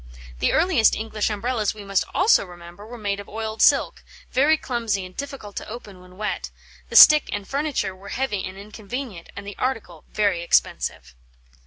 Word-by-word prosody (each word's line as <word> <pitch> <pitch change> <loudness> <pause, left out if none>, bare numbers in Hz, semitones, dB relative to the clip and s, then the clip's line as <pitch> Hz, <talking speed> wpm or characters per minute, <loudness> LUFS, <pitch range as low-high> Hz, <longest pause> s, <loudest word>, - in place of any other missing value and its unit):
The - - +2
earliest 320 -10 +3
English 220 -1 -2
Umbrellas, 215 0 -1
we 210 - -9
must 195 -1 0
also 395 +5 +4
remember, 175 +2 -12
were 245 +1 -9
made 200 -2 -2
of 200 - -10
oiled 220 0 -4
silk, - - +3 0.3
very 290 +5 +4
clumsy 230 -8 -2
and 185 0 -13
difficult 275 -8 -7
to - - -6
open 210 -5 -10
when 180 0 -17
wet; 210 0 -3 0.4
the - - -7
stick 305 -1 +9
and 205 -1 -4
furniture 280 -9 -2
were 195 +2 -12
heavy 235 -7 -2
and 185 +1 -7
inconvenient, 210 -1 -7
and 200 +1 -8
the 205 -1 -7
article 220 -11 -3
very 200 -5 +1
expensive. 60 - 0
210 Hz, 175 wpm, -23 LUFS, 195-245 Hz, 0.4 s, stick